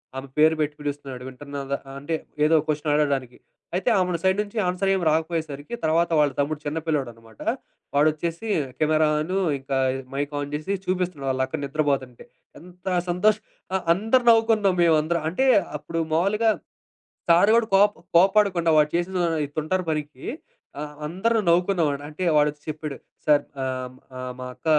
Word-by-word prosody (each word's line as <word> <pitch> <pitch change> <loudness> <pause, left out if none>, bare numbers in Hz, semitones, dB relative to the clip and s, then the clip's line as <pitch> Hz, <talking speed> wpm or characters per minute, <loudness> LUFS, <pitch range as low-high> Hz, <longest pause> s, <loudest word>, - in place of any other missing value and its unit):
ఆమె 135 +1 -6
పేరు 160 +1 +5
పెట్టి 150 -1 -1
పిలుస్తున్నాడు, 140 -3 -5
వింటున్నదా 140 +1 -5 0.2
అంటే 155 +4 -2 0.3
ఏదో 160 +1 +4
క్వెషన్ 150 0 0
ఆడడానికి. 140 -4 0 0.4
అయితే 190 +7 +1
ఆమెని 180 -2 0
సైడ్ 190 +1 +3
నుంచి 210 +2 -11
ఆన్సర్ 185 +2 0
ఏమి 185 -3 0
రాకపోయేసరికి, 160 +1 -2
తర్వాత 165 +2 +2
వాళ్ళ 145 -2 +3
తమ్ముడు 145 +1 0
చిన్న 150 +2 -2
పిల్లోడునమాట. 120 -8 -4 0.5
వాడు 150 +2 +5
ఒచ్చేసి 170 +7 -4 0.3
కెమెరా 155 0 +3
అను, 185 +5 -1 0.2
ఇంకా 135 0 -2 0.2
ఇది 135 -1 -6
మైక్ 145 +1 -2
ఆన్ 145 0 -6
చేసి, 155 +6 -4
చూపిస్తున్నాడు 180 -6 -2
వాళ్ళు 130 0 0
అక్కడ - - -4
నిద్రపోతుంటే. 140 -4 -2 0.3
ఎంత 180 +2 -17 0.2
సంతోష్ 210 +5 +2 0.3
ఆ - - +3 0.2
అందరూ 225 +6 +2
నవ్వుకున్నాం 225 -4 +3
మేము 165 -2 +5
అందరం. 170 +1 -1
అంటే 265 +8 +1 0.3
అప్పుడు 165 +3 -4
మామూలుగా 210 +7 +3 0.8
సారు 175 +5 +6
కూడా 235 -1 +3
కోప 205 +2 +6 0.2
కోపాడకుండా 190 -2 +4
వాడు 150 0 +4
చేసిన 180 +2 -1 0.4
తుంటారు 180 +4 -1
పనికి, 150 -3 -5 0.5
ఆ! - - -4 0.2
అందరూ 195 +8 0
నవ్వుకునేవాడు. 170 -5 +2
అంటే 155 +5 -6
వాాడు 150 0 +5
ఒచ్చి 150 0 -22
చెప్పాడు. 150 -2 -5 0.3
"సారు 145 -1 +4 0.2
ఆహ్, 130 -1 -4 0.2
ఆహ్, 130 0 -5
మా 125 - -5
అక్క - - -29
155 Hz, 155 wpm, -24 LUFS, 145-185 Hz, 0.8 s, సారు